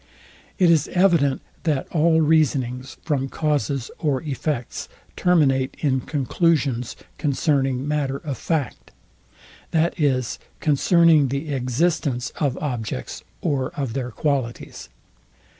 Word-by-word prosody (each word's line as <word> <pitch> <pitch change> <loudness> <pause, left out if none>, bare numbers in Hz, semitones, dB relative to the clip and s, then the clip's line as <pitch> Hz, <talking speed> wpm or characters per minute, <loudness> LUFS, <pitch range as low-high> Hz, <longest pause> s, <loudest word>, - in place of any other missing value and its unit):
It 180 -4 +5
is 155 -3 +3
evident, 170 -8 +2 0.2
that 150 -5 0
all 160 0 +3
reasonings 135 -5 +1
from 135 -4 -1
causes 145 -4 -1
or 145 -4 0
effects 145 -3 -3 0.3
terminate 135 -7 +2
in 135 -4 +1
conclusions, 140 -4 0 0.2
concerning 135 -2 +1
matter 145 -2 -1
of 140 -1 -5
fact; 160 -5 -2 0.8
that 165 +2 +1
is, 130 -5 0 0.2
concerning 160 0 +4
the 140 +3 -3
existence 130 -1 0
of 140 -5 0
objects 115 - -4 0.2
or 135 -3 0
of 135 -5 -2
their 125 -1 -3
qualities. 130 -1 -3
140 Hz, 110 wpm, -23 LUFS, 130-155 Hz, 0.8 s, It